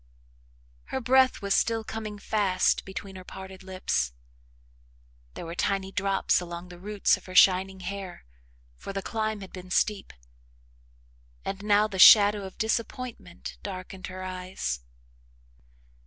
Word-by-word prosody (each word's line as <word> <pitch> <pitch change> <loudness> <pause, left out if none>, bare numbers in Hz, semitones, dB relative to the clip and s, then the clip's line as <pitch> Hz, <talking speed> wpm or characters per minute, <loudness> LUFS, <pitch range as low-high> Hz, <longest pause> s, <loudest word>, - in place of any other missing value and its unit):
Her - - -3
breath 260 -2 +3
was 200 0 +1
still 225 -1 +1
coming 215 -1 -6
fast 200 -3 +1
between 195 0 -7
her 185 - -9
parted 190 0 -10
lips. 185 - -1 1.2
There - - -6
were 165 - -6
tiny 195 +1 -1
drops 195 -1 +1
along 175 0 -7
the 175 -1 -11
roots 205 +2 +1
of - - -16
her 185 - -9
shining 190 0 +5
hair, 190 - -6 0.5
for 195 - -7
the 195 0 -3
climb 220 -2 -2
had 190 - -10
been 185 -1 -9
steep, 200 +1 0 1.3
and 195 0 -4
now 210 0 +3
the 195 -3 -6
shadow 205 0 +8
of 190 - -10
disappointment 225 -4 -4
darkened 185 -1 -7
her 185 0 -7
eyes. 185 - -4
195 Hz, 135 wpm, -27 LUFS, 185-210 Hz, 1.3 s, shadow